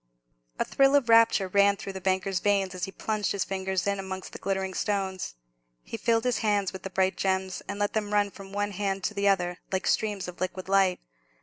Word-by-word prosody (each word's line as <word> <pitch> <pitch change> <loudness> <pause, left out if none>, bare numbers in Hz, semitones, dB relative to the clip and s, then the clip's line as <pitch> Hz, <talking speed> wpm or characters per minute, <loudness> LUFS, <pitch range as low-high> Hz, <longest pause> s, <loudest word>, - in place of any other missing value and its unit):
A - - 0
thrill 275 +1 +4
of 265 -5 +2
rapture 230 -4 +5
ran 200 +1 +4
through 195 - -6
the 190 - -7
banker's 190 0 0
veins 200 -2 +1
as 180 -1 -3
he 195 - -8
plunged 215 +1 -2
his 200 - 0
fingers 190 -1 -2
in 200 -1 0
amongst 190 -1 -6
the - - -7
glittering 190 -1 -2
stones. 190 - -2 0.5
He - - -7
filled 225 0 +1
his 250 -1 +1
hands 205 -3 +1
with 190 - -7
the 195 - -6
bright 190 0 +1
gems, 190 -1 -1
and 200 - -4
let 205 0 0
them 210 -1 -1
run 205 -1 +2
from 195 -1 -11
one 205 +1 -1
hand 195 0 -2
to - - -1
the 200 -1 0
other, 180 -3 +1
like 190 0 -1
streams 205 -4 0
of 180 0 -9
liquid 185 0 -3
light. 195 -2 +3
195 Hz, 220 wpm, -27 LUFS, 190-205 Hz, 0.5 s, rapture